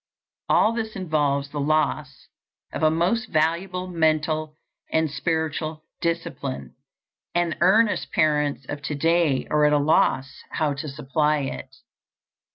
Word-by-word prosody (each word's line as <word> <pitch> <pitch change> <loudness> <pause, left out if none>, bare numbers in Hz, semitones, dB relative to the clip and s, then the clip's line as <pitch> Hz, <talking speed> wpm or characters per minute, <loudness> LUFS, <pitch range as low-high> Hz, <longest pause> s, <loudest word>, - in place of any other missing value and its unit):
All 220 - +4
this 220 -2 -4
involves 145 -6 0
the 145 - -4
loss 150 -1 -1 0.5
of - - -4
a 155 - +5
most 180 +10 +1
valuable 170 +4 0
mental 155 -2 0 0.4
and 160 -2 +1
spiritual 155 0 -2 0.2
discipline, 140 - -3 0.6
and 175 -2 +1
earnest 215 +3 +3
parents 150 -3 +1
of 145 - -5
to 150 0 -3
day 165 -2 +2
are 150 0 +3
at 150 0 +4
a - - +5
loss 140 -2 +1
how 150 -2 0
to 150 +2 -5
supply 150 +2 0
it. 135 - -6
155 Hz, 130 wpm, -24 LUFS, 145-170 Hz, 0.6 s, a